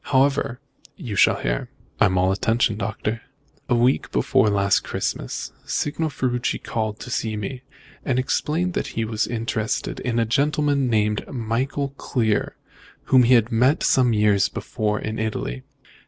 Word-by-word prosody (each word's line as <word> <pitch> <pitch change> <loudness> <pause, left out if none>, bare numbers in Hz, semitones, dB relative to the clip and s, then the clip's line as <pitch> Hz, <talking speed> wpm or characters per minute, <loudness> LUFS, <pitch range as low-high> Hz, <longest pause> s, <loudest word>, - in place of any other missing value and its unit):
However, 135 -2 +1 0.4
you 120 - -6
shall - - +4
hear." - - -2 0.3
"I'm 95 -1 +3
all 95 +1 +3
attention, 110 +3 +1
Doctor." 110 +2 -3 0.5
"A 120 - +4
week 120 +3 +2
before 110 - +2
last 100 -1 +3
Christmas, - - -4
Signor 155 +2 -1
Ferruci 125 -3 -1
called 110 -1 -3
to 125 - -7
see 110 -2 -1
me, 125 +5 -5 0.4
and 130 - 0
explained 160 +7 0
that - - -2
he 115 - +1
was 110 -1 -1
interested 115 -1 -2
in 120 -2 -2
a 115 - +3
gentleman 140 +2 +1
called 105 -2 0
Michael 130 +5 -1
Clear, 110 -5 0 0.6
whom 130 - +8
he 125 +1 +5
had 115 0 +2
met 125 +6 +3
some 125 -2 +4
years 105 -2 +3
before 105 -1 -2
in 110 +1 -4
Italy. 105 - -3
115 Hz, 150 wpm, -23 LUFS, 105-130 Hz, 0.6 s, whom